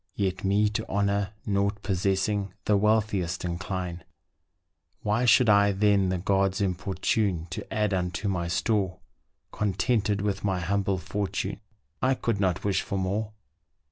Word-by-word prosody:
Yet 95 -2 -1
me 100 +2 +3
to 105 - -4
honour, 100 0 0
nought 100 0 0
possessing 95 +1 0
The 105 - +3
wealthiest 100 -5 +1
incline; 90 0 -4 1.0
Why 110 +4 +1
should 120 +1 +6
I 100 -1 +5
then 100 -1 +3
the 95 - 0
gods 95 +1 +1
importune 95 -1 0
To - - -6
add 105 -2 +1
unto 90 +2 -1
my 90 -3 -1
store, 95 +1 0 0.5
Contented 105 +1 0
with 100 -1 -2
my 95 -3 0
humble 95 +2 0
fortune 95 +3 -3 0.4
I 130 +1 +3
could 115 -5 -1
not 95 -2 0
wish 100 -2 +1
for 100 - -3
more. 105 +3 -2
100 Hz, 140 wpm, -27 LUFS, 95-105 Hz, 1.0 s, should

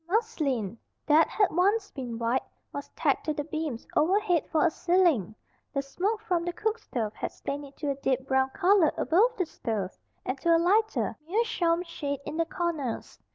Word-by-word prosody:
Muslin, 285 - 0 0.3
that 310 +1 +5
had 410 -3 +2
once 400 +5 +2
been 245 -4 -5
white, 235 +3 +1 0.3
was 285 - -6
tacked - - +1
to 310 -2 -1
the 290 - -2
beams 310 -5 -4
overhead 360 +1 +2
for 315 +2 +3
a 340 - +3
ceiling. 335 - +2 0.4
The 275 - +1
smoke 405 +10 -2
from 355 -6 0
the 350 - -1
cookstove 285 - -2
had - - -4
stained 285 +1 -5
it 275 0 -15
to 290 -2 -1
a - - -2
deep 265 -1 -1
brown 265 0 +2
color 365 +1 +4
above 455 +9 +3
the 365 - +1
stove 215 - -3 0.3
and 260 +2 -2
to 335 -1 +4
a - - +6
lighter, 415 +6 +2
meerschaum 355 -4 +1
shade 285 -5 -4
in 315 - -5
the 330 - +2
corners. 320 -8 -3
320 Hz, 180 wpm, -28 LUFS, 270-370 Hz, 0.4 s, a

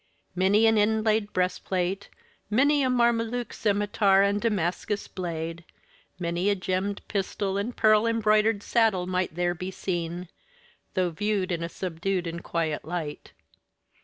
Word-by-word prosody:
Many 195 +4 +3
an 225 -1 +4
inlaid 215 0 +2
breastplate 185 +1 -1 0.4
many 285 +7 +3
a 260 - +2
Mameluke 235 -1 +1
scimitar 205 -1 +2
and 200 +1 +1
Damascus 205 -1 -1
blade 165 -2 -5 0.5
many 175 +2 -1
a 205 - +3
gemmed 190 +1 -2
pistol 195 -1 -2
and 205 +5 -3
pearl 215 +1 +4
embroided 215 -2 +2
saddle 220 -6 +2
might 185 -2 -1
there 175 0 +1
be 180 +2 -5
seen, 175 -1 -3 0.7
though 180 -2 +1
viewed 200 +1 -1
in 170 -1 -1
a 170 - -3
subdued 180 +1 -2
and 170 0 -5
quiet 160 -3 -2
light. 160 -2 -5
195 Hz, 135 wpm, -27 LUFS, 175-215 Hz, 0.7 s, an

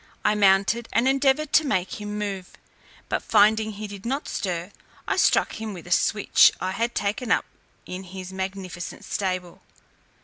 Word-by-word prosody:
I - - +4
mounted, 200 +3 +3
and 235 +3 +2
endeavoured 275 +2 +2
to 315 - +6
make 190 -6 -2
him 210 0 -5
move: 195 -3 -4 0.5
but - - -1
finding 215 +1 +3
he 210 +1 -6
did 200 -2 -9
not 270 +5 -2
stir, 180 -1 -3 0.4
I - - +1
struck - - +2
him 215 -3 -5
with 175 - -10
a 175 - -11
switch 210 +3 +5
I 185 - -2
had 230 +4 -2
taken 210 +4 -1
up - - +3 0.4
in 185 +1 -7
his 185 0 -8
magnificent 190 -2 -6
stable. 185 -3 -3
205 Hz, 165 wpm, -24 LUFS, 190-225 Hz, 0.5 s, to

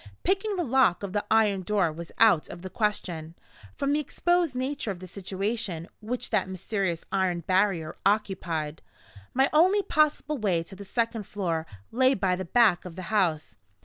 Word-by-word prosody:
Picking 395 +2 +1
the 355 - 0
lock 260 - +3
of 195 -2 -4
the 205 - 0
iron 210 -3 +3
door 190 -3 +1
was 165 +2 -8
out 210 -9 +5
of 175 - -9
the 185 - -7
question, 175 -7 -2 0.4
from 280 0 0
the 295 - +2
exposed 345 0 0
nature 260 -1 -2
of 195 - -3
the 185 - -9
situation 195 -1 -3
which 235 +3 -4
that 195 -4 +1
mysterious 190 -2 -2
iron 185 -3 +1
barrier 185 -2 +1
occupied. 185 -7 -1 0.5
My 265 +2 +4
only 375 +6 +5
possible 305 -2 +1
way 185 -6 +1
to 195 +3 -12
the 200 - -9
second 230 0 -2
floor 165 -5 -2 0.2
lay 260 +3 +3
by 190 -2 +1
the 190 +1 -5
back 215 -1 +4
of 180 -3 -9
the 185 - -6
house. 160 - +1
200 Hz, 175 wpm, -27 LUFS, 175-245 Hz, 0.5 s, out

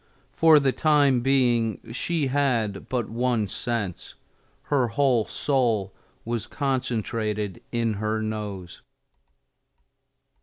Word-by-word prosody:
For 160 -2 +6
the 140 -2 +2
time 145 -3 +3
being 120 -4 +2
she 160 +4 -1
had 125 -7 0
but 120 -4 -1
one 120 -1 0
sense: 100 -3 -4 0.5
her 135 -4 +1
whole 125 -2 +2
soul 115 -9 0 0.3
was 115 -1 -3
concentrated 115 - -2
in 115 -2 0
her 110 +2 -2
nose. 105 -5 -5
120 Hz, 100 wpm, -25 LUFS, 110-135 Hz, 0.5 s, For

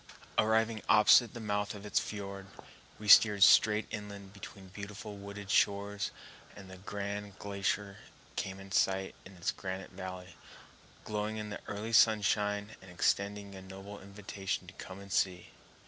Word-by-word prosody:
Arriving 110 0 +2
opposite 110 +2 +6
the - - -5
mouth 105 -1 -2
of 100 0 -10
its 105 - +2
fiord, 100 -2 -6 0.5
we 105 - -8
steered 105 -1 +8
straight 105 +2 +6
inland 100 -2 -7
between 100 -1 -11
beautiful 105 +2 -8
wooded 100 0 -7
shores, 100 -1 +1 0.5
and 95 -2 -11
the 95 - -10
grand 100 +1 -5
glacier 100 0 -2 0.4
came 95 0 -3
in 95 0 -12
sight 95 0 +1
in 95 - -12
its 85 -2 -1
granite 95 0 -6
valley, 90 -2 -8 0.7
glowing 105 +1 -3
in 105 -1 -5
the 100 - -6
early 105 +3 -4
sunshine 105 -1 +3
and 95 - -13
extending 100 +3 0
a 95 - -9
noble 95 +2 -10
invitation 100 -1 -5
to 90 - -12
come 95 +1 -9
and 100 0 -11
see. 90 -2 0
100 Hz, 150 wpm, -32 LUFS, 95-105 Hz, 0.7 s, steered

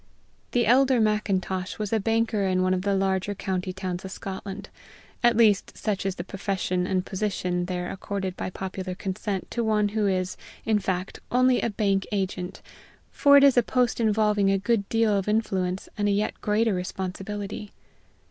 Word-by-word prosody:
The 240 -1 +3
elder 260 +2 +4
Macintosh 195 -3 0
was 210 0 -3
a 220 - +3
banker 225 0 +1
in 185 0 +2
one 185 0 +2
of 185 - 0
the 200 +1 +1
larger 190 +1 0
county 185 -1 -2
towns 185 -1 -4
of 190 - -6
Scotland 195 +1 -7 0.5
at 240 -2 +4
least, 215 -4 +3
such 200 -3 -1
is 190 - -2
the 175 - -5
profession 185 -2 -2
and 185 -1 0
position 185 -3 -1
there 180 -1 -3
accorded 190 -1 -4
by - - -4
popular 185 0 -5
consent 190 +1 -4
to 235 - -1
one 210 -2 +2
who 210 0 0
is, 185 -1 -1 0.3
in 215 -1 +3
fact, 185 -1 -3
only 255 0 +4
a 235 - 0
bank 195 -2 0
agent, 190 -2 -3 0.5
for 285 -1 +6
it 280 - +7
is 275 -3 +6
a - - +8
post 245 +1 +1
involving 210 -2 +2
a 195 - +3
good 205 0 0
deal 225 -2 +2
of 195 0 -1
influence 190 -4 0
and 205 - +2
a - - +3
yet 205 +1 -1
greater 215 +1 +2
responsibility. 195 +3 -4
200 Hz, 175 wpm, -26 LUFS, 185-215 Hz, 0.5 s, a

